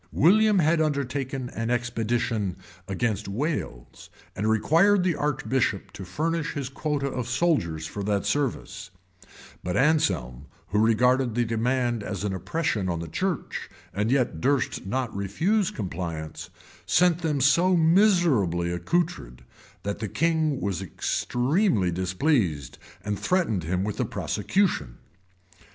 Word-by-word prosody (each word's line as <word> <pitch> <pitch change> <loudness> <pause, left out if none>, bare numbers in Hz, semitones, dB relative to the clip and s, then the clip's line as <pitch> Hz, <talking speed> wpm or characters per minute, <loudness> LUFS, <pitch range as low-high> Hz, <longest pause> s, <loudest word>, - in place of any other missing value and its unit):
William 210 +6 +4
had 160 -1 +3
undertaken 135 -3 -2
an 115 0 -3
expedition 115 -4 -1 0.3
against 105 +1 -1
Wales, 105 - -4 0.3
and 105 +2 0
required 170 - +4
the 180 -2 +2
archbishop 135 -8 -1
to 100 - -8
furnish 160 - -2
his 140 -3 -4
quota 145 0 -2
of 125 -3 -3
soldiers 120 - 0
for 100 - -6
that 100 0 0
service, 145 -4 -2 0.7
but 90 - -2
Anselm, 85 - +1 0.2
who 105 +3 +1
regarded 120 +2 +3
the 120 0 +2
demand 120 +1 0
as 100 -1 -4
an 100 -2 -1
oppression 105 - -1
on 85 -1 -2
the 85 - -5
church, 185 - -3 0.2
and 105 +3 0
yet 130 -1 +1
durst 135 -7 0
not 125 +1 -2
refuse 165 - 0
compliance, 85 -5 -5 0.4
sent 175 0 +4
them 155 -4 -1
so 170 +8 +4
miserably 160 - +3
accoutred, 85 - -2 0.4
that 100 0 -3
the 110 - -3
king 160 - +1
was 100 -3 -2
extremely 125 - 0
displeased, 90 - 0 0.3
and 105 -1 -2
threatened 140 - 0
him 90 +3 -1
with 105 0 -4
a - - +1
prosecution. 105 - -1
120 Hz, 130 wpm, -26 LUFS, 95-155 Hz, 0.7 s, William